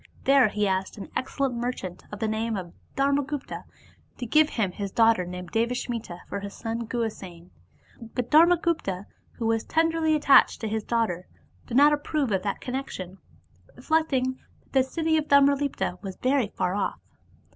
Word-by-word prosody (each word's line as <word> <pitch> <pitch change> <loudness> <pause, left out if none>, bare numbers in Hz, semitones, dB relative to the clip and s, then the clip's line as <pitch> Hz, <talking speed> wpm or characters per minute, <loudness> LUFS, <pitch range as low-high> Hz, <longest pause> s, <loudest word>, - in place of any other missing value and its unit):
There 275 -3 +5
he 210 0 0
asked 190 +1 -1
an 200 - -9
excellent 265 0 -1
merchant 235 -7 -4
of 205 - -6
the 220 - -1
name 220 0 -1
of 175 -3 -7 0.2
Dharmagupta 280 0 -1 0.5
to 250 - -4
give 305 +6 +4
him 205 -9 -1
his 200 +1 -5
daughter 225 -5 +4
named 180 -1 -7
Devasmita 230 -5 -2
for 200 - -4
his 200 0 -7
son 230 0 -4
Guhasena. 195 -7 -5 0.6
But 250 -1 -2
Dharmagupta, 320 - +3 0.3
who 230 - -5
was 225 0 +1
tenderly 325 -1 +2
attached 280 -2 +5
to 220 - -2
his 220 0 -2
daughter, 215 -7 -1 0.4
did 240 - -1
not 295 +2 +7
approve 290 -3 -1
of 190 -2 +1
that 200 +1 -3
connection, 195 -8 -5 0.6
reflecting 270 -5 0 0.2
that - - -32
the 265 -1 +5
city 320 +4 0
of 310 - 0
Tamralipta 280 -10 +2
was 190 -2 -6
very 255 -1 +1
far 185 -3 -2
off. 200 -1 -2
235 Hz, 160 wpm, -26 LUFS, 200-280 Hz, 0.6 s, not